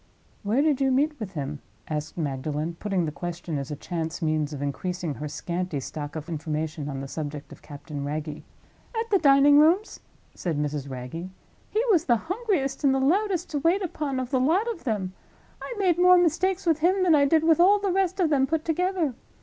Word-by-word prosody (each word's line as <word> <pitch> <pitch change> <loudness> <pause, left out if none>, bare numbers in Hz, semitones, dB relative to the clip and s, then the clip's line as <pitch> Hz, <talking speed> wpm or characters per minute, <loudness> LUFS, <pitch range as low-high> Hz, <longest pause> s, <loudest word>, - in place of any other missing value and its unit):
"Where 225 +8 +1
did 295 -4 +2
you 270 - +3
meet 290 +3 +1
with 200 -4 -6
him?" 145 -2 -4 0.3
asked 155 +1 -4
Magdalen, 150 +2 -2
putting 195 -4 0
the 155 - -3
question 170 -1 -4
as 140 - -6
a 150 - -3
chance 160 +1 -4
means 155 -3 0
of 145 - -6
increasing 165 +4 -3
her 150 +2 -5
scanty 170 +1 -3
stock 145 +2 -6
of 155 0 -6
information 155 -2 -3
on 135 -1 -4
the 135 - -6
subject 145 0 -6
of - - -12
Captain 145 -1 -7
Wragge. 150 +1 -4 0.6
"At 455 0 -3
the 395 - +5
Dining 285 -1 +6
rooms," 345 +8 +3 0.3
said 170 -5 -3
Mrs. 145 -1 -2
Wragge. 130 +8 -6 0.4
"He 440 - +1
was 340 -4 +3
the 240 - +4 0.2
hungriest 370 - -1
and 270 -1 +4
the - - +1
loudest 360 +5 +1
to 295 - -1
wait 345 +7 +2
upon 295 -6 -2
of 255 0 -4
the 260 - +2
lot 340 - +2
of 335 - -9
'em. 195 -5 -1 0.5
I - - -6
made 365 -4 +2
more 360 0 +7
mistakes 360 +3 +1
with 325 -2 +2
him 370 +4 +3
than 350 -3 +4
I 285 -2 +5
did 315 +2 +3
with 325 -1 +4
all 390 +4 +6
the 400 -2 -1
rest 375 0 0
of 335 -4 +2
them 270 -2 +3
put 320 +1 -1
together. 350 -3 0
255 Hz, 205 wpm, -26 LUFS, -, 0.6 s, more